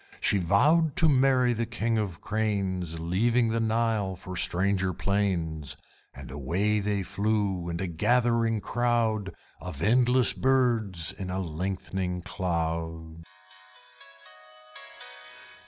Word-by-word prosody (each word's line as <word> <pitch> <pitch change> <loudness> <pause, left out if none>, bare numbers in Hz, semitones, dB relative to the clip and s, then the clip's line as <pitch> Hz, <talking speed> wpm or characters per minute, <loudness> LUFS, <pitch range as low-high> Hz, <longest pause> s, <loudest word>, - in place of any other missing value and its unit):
She 100 - +2
vowed 145 - +3
to 165 - +3
marry 130 -3 +3
the 115 0 -2
King 115 -1 -1
of 100 -4 -2
the - - -19
Cranes, 95 -6 -2
Leaving 115 +8 +1
the 115 +1 0
Nile 110 -3 0
for 95 0 -8
stranger 95 +1 +1
plains; 85 -7 -1 0.4
And - - -10
away 90 +10 0
they 100 -1 -1
flew 100 -3 -1
in 85 0 -4
a 95 - -1
gathering 115 +5 +1
crowd 115 -5 0 0.3
Of 85 -4 -6
endless 125 +3 +4
birds 115 -10 +1
in 95 -2 -6
a 90 - -2
lengthening 90 +1 -3
cloud. 80 -3 -3
100 Hz, 115 wpm, -27 LUFS, 90-115 Hz, 0.4 s, endless